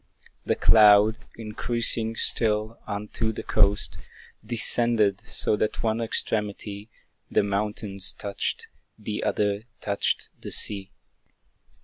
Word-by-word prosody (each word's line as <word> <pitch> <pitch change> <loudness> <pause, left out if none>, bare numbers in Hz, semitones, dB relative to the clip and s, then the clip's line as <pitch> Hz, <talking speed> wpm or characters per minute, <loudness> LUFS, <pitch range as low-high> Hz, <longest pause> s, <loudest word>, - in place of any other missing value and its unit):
The - - +1
cloud, 105 0 +6 0.2
increasing 115 0 -1
still, 110 0 +1
unto 105 +2 -3
the 110 - -7
coast 100 -1 +1 0.5
Descended, 115 -2 +2
so 110 - +1
that 105 0 -2
one 110 0 0
extremity 105 -1 -2 0.4
The - - +2
mountains 100 -1 -3
touched, 100 -1 -4 0.3
the 105 -1 -5
other 105 +1 -1
touched 100 0 -2
the - - -7
sea. 100 -2 +2
105 Hz, 100 wpm, -25 LUFS, 100-110 Hz, 0.5 s, cloud